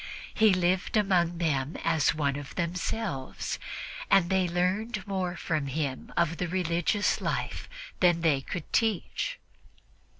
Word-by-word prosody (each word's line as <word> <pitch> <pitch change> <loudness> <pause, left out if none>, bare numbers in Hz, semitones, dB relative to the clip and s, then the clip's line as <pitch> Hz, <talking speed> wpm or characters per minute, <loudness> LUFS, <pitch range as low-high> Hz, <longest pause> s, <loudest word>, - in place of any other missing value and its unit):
He 220 -2 +5
lived 185 +3 +1
among 180 -4 +2
them 150 -3 0
as 160 -4 +3
one 140 -3 +1
of 145 -1 -7
themselves, 175 -3 -2 0.5
and 190 -3 +4
they 190 -1 +3
learned 190 +4 0
more 190 -3 -2
from 155 -5 -1
him 135 -1 -3
of 170 -1 +2
the 180 - -1
religious 180 +3 +1
life - - -2 0.3
than 175 -2 +4
they 150 -5 +3
could 175 +6 -6
teach. 220 -6 0
175 Hz, 130 wpm, -29 LUFS, 160-190 Hz, 0.5 s, He